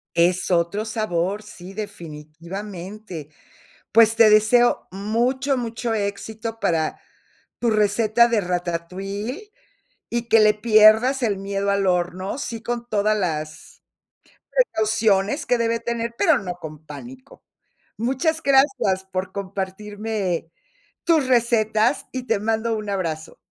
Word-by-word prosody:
Es 175 +2 +2
otro 175 +4 +1
sabor, 210 -3 -2
sí, 195 -3 -11
definitivamente. 180 0 -8 0.6
Pues 225 0 +6
te 225 -2 +7
deseo 215 +3 +4
mucho, 245 +8 0
mucho 230 -1 -3
éxito 220 +2 -4
para 160 -6 0 0.6
tu 240 - +1
receta 215 +2 +3
de 230 -3 +1
ratatouille 190 - -4 0.6
y 235 0 -3
que 225 - +6
le 215 0 +5
pierdas 220 +4 +5
el 210 -4 +1
miedo 195 +1 -2
al 200 -1 +1
horno, 180 +3 -1
sí 230 -5 -5
con 240 0 -3
todas 215 0 +1
las 155 -5 -4 0.7
precauciones 220 - +1
que 245 - +2
debe 230 0 0
tener, 235 0 -3
pero 325 -4 +4
no 180 -3 -5
con 155 -3 -10
pánico. 250 - -11 0.6
Muchas 270 +8 0
gracias 270 -9 +3
por 185 0 -2
compartirme 200 -2 -4 0.5
tus 325 -5 +3
recetas 230 -1 +2
y 255 -1 -4
te 205 - +1
mando 225 +2 0
un 210 -1 -5
abrazo. 165 -5 -3
215 Hz, 120 wpm, -22 LUFS, 185-235 Hz, 0.7 s, te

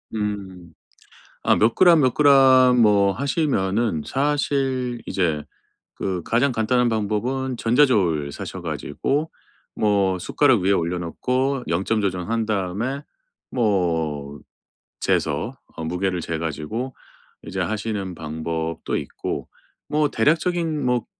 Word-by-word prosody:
음. 95 -5 -5 0.7
아 - - +4
몇 110 +2 +3
그램 175 -4 +6
몇 130 -3 +3
그램 130 -3 +6
뭐 100 -2 +4
하시면은 115 - 0
사실 135 -3 0
이제 80 -6 0 0.5
그 90 -2 -3
가장 125 +5 +2
간단한 120 +1 +1
방법은 120 +5 -1
전자저울 105 - +2
사셔 - - -7
가지고 145 - -2 0.4
뭐 100 -3 +1
숟가락 130 +4 +3
위에 95 +2 +2
올려놓고 100 +10 -1
0 85 +3 0
점 115 +1 +1
조정한 100 +4 -1
다음에 110 +7 -2 0.5
뭐 80 - -1 0.6
재서 - - 0 0.2
어 80 - -5
무게를 90 +2 -1
재 85 0 -3
가지고 85 - -4 0.5
이제 - - -4
하시는 105 -3 -3
방법도 80 +1 -4
있고. - - -5 0.4
뭐 150 -1 +1
대략적인 160 +3 +1
뭐 125 -2 +1
110 Hz, 225 characters per minute, -22 LUFS, 90-130 Hz, 0.7 s, 그램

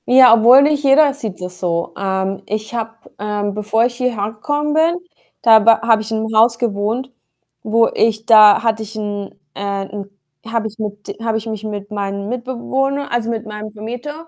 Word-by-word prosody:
Ja, 255 -1 +7
obwohl 240 +4 +7
nicht 295 0 +1
jeder 280 +1 +5
sieht 225 -9 -7
das 180 0 -7
so. 170 -1 -2
Ähm, 190 0 -2
ich 215 +2 -4
habe, 225 -1 -4 0.2
ähm 205 0 -3
bevor 210 +2 0
ich 240 0 -3
hierher 235 -5 -2
gekommen 295 +7 -2
bin, 325 +2 +2 0.5
da 225 -1 +7
ba 225 +1 +4
habe 225 -2 +3
ich 215 - -7
in 220 0 -1
'nem 220 0 -4
Haus 230 +2 +4
gewohnt, 230 +3 -2 0.5
wo 225 +1 +2
ich 220 -1 0
da 215 -2 +7
hatte 220 -1 0
ich 220 0 -8
'n 205 -2 -5 0.2
äh, - - -9 0.2
'n 200 0 -8 0.4
habe 225 -1 -2
ich 220 +1 -12
mit 205 -1 -6
habe 225 -1 -1
ich 220 - -6
mich 220 -2 -6
mit 205 -1 -6
meinem 200 0 -4
Mitbewohner, 260 +3 -3
also, 235 -1 -1
mit 230 0 -4
meinem 215 0 -8
Vermieter, 245 +9 -8
220 Hz, 190 wpm, -17 LUFS, 210-240 Hz, 0.5 s, Ja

